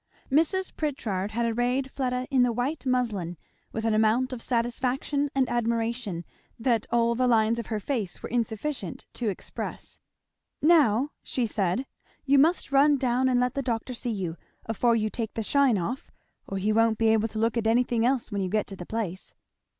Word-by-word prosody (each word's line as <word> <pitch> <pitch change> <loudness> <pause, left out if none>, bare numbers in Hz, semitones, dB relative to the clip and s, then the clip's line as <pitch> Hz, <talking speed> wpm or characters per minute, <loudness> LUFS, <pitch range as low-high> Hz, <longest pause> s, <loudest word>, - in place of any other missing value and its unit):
Mrs. 335 +6 +1
Pritchard 220 - -2
had 235 +1 0
arrayed 245 +3 0
Fleda 250 -1 -1
in 265 -2 +4
the 245 -1 +4
white 260 +5 -2
muslin, 210 -9 0 0.3
with 225 0 -3
an 225 - +2
amount 225 +4 +2
of 240 - -6
satisfaction 255 +4 0
and 265 -2 +3
admiration 230 -5 -1 0.3
that 230 -2 +1
all 235 0 +2
the 250 +2 +1
lines 230 -1 +3
of 230 - -5
her 215 -2 -2
face 210 -6 -3
were - - -5
insufficient 230 - -3
to 235 -3 -1
express. 195 - -6 0.6
"Now," 290 -5 +4
she 250 - -1
said, 205 +2 0 0.4
"you 280 0 +5
must 330 +6 +4
just - - -16
run 285 +1 +5
down 255 0 +1
and 250 -1 +3
let 250 0 +1
the 275 - -1
doctor 245 0 -2
see 240 0 -4
you 185 -7 -3 0.3
afore 230 +2 +2
you 215 -1 0
take 225 -3 -4
the 225 - -2
shine 275 -1 +3
off 230 +9 -4 0.4
or 195 - -3
he 210 +3 +1
won't 225 0 +3
be 225 0 +3
able 220 0 +3
to 220 - -8
look 225 +2 +1
at 225 -2 0
anything 235 0 +2
else 250 -1 +1
when 200 -1 -1
you 185 - -1
get 215 +2 +1
to 195 - -6
the 175 -2 -9
place." 200 -5 -4
235 Hz, 190 wpm, -27 LUFS, 220-255 Hz, 0.6 s, you